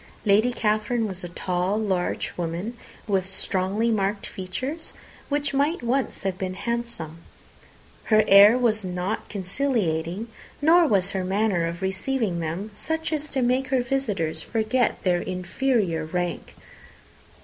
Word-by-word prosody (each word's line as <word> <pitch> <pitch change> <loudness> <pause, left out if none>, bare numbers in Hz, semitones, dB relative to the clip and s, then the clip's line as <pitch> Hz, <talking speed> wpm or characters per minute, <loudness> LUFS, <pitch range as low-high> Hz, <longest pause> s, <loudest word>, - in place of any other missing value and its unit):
Lady 215 +4 +4
Catherine 215 0 0
was 190 -2 -6
a 175 - -5
tall, 180 +3 -1
large 190 -5 -1
woman, 175 +7 -3 0.3
with 190 -3 0
strongly 195 +4 0
marked 200 -1 0
features, 255 - -5 0.4
which 290 0 0
might 285 +2 +1
once 255 0 -1
have 190 -1 -2
been 185 -2 -3
handsome. 235 -9 -4 0.9
Her 215 -1 +5
air 200 +4 +8
was 220 -4 +2
not 180 +4 -3
conciliating, 195 - -1 0.3
nor 330 +3 +5
was 195 -4 +2
her 190 -1 -2
manner 190 -2 +1
of 170 +2 -5
receiving 190 0 -1
them 170 +6 -4
such 320 +6 -2
as 305 -1 -1
to 265 -3 0
make 255 +2 +2
her 260 -2 +2
visitors 215 -11 -1
forget 225 +2 0
their 180 -2 +2
inferior 185 -2 0
rank. 175 +2 -3
205 Hz, 135 wpm, -25 LUFS, 185-245 Hz, 0.9 s, air